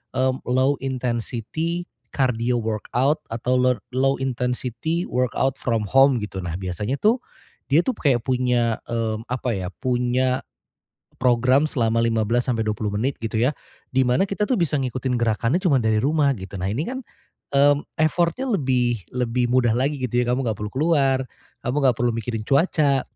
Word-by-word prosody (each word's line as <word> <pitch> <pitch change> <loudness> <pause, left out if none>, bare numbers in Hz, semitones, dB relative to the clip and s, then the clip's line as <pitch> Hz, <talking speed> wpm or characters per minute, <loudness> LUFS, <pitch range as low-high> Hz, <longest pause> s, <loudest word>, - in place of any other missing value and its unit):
eee, 130 0 +2
low 130 +3 +2
intensity, 130 +7 -3 0.2
cardio 125 -2 +1
workout 120 +7 0
atau 120 +2 0
row 125 -1 +3 0.2
low 135 +1 +3
intensity 125 +5 -2
workout 125 +1 0
from 115 -4 0
home 135 +3 +5
gitu 105 -3 -5
nah 85 -2 -4
biasanya 95 +8 -3
tuh, 215 +3 +4 0.6
dia 145 - +6
tuh 255 - -1
kayak 130 -6 +2
punya, 125 -3 +1
mmm, 115 -2 -2
apa 125 -2 -1
ya 90 -2 -3
punya. 125 +3 0 0.8
Program 125 +3 +3
selama 115 -6 0
15 115 +1 +1
sampai 120 -4 0
20 105 -1 -2
menit 125 +7 -1
gitu 115 -1 -5
ya, 125 +4 +3 0.4
di 130 0 +3
mana 125 +7 +3
kita 200 +2 -1
tuh 255 - +1
bisa 165 -4 +1
ngikutin 130 -1 -2
gerakannya 115 +4 +1
cuma 140 -8 +3
dari 110 -1 +2
rumah 145 +1 +3
gitu 95 +1 -9
nah 95 - -1
ini 125 +10 -1
kan, 260 +1 -4 0.5
mmm, 145 +1 +4 0.2
effort-nya 170 - +1
lebih 125 - +1
lebih 125 0 0
mudah 125 -2 +3
lagi 140 +4 0
gitu 125 -1 0
ya 120 - -2
kamu 130 +2 0
enggak 110 - 0
perlu 105 0 -4
keluar, 140 -2 +2 0.5
kamu 125 +3 -1
enggak 125 -3 +4
perlu 120 0 +2
mikirin 115 -1 -3
cuaca. 140 -2 +3
125 Hz, 165 wpm, -23 LUFS, 115-135 Hz, 0.8 s, dia